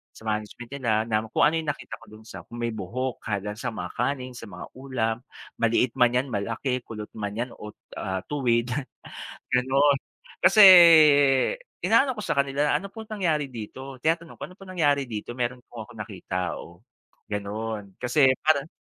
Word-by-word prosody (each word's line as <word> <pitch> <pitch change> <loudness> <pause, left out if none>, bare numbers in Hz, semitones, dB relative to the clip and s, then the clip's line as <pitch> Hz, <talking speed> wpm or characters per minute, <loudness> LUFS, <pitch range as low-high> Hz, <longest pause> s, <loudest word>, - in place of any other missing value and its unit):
Sa - - -15
management 110 +2 -4
nila 120 -4 -1 0.2
na 110 0 0
kung - - +1
ano 160 +2 +4
yung 160 - -6
nakita - - -9
ko 115 - -14
dun 110 +1 -14
sa - - -10
kung 120 - -10
may 115 - 0
buhok 120 +5 -4
kada 105 -1 -3
sa 125 +2 -3
mga 110 - -5
kaning, 130 0 -2
sa - - -8
mga 90 -1 -8
ulam, 125 -4 -2 0.4
maliit 115 +2 +2
man 120 -1 +4
'yan 125 +2 +1
malaki, 115 +5 -2
kulot 105 -2 -7
man 105 -1 -4
'yan 120 +2 -3
o, 105 0 -9 0.3
ah, 95 0 -3
tuwid, 120 -4 +1 0.8
gano'n. 135 +3 +3 0.4
Kasi 215 - +6 1.2
inaano 270 -1 +4
ko 210 - -6
sa 140 - -2
kanila, 140 +1 +1
"Ano 200 - -7
po 225 - -8
nangyari 160 -9 -1
dito?" 130 +4 -8
Tinatanong 165 +3 -1
ko, - - -6
"Ano 180 - -15
po - - -11
nangyari 145 -6 +2
dito?" 110 +2 -5
Meron 125 0 -3
po 115 -2 -9
akong 120 +1 -15
nakita, 90 -4 -4
oh, 85 0 -14 0.5
gano'n 105 -1 -5
kasi 130 +3 +3 0.2
para 155 -1 +2
120 Hz, 175 wpm, -25 LUFS, 110-140 Hz, 1.2 s, Kasi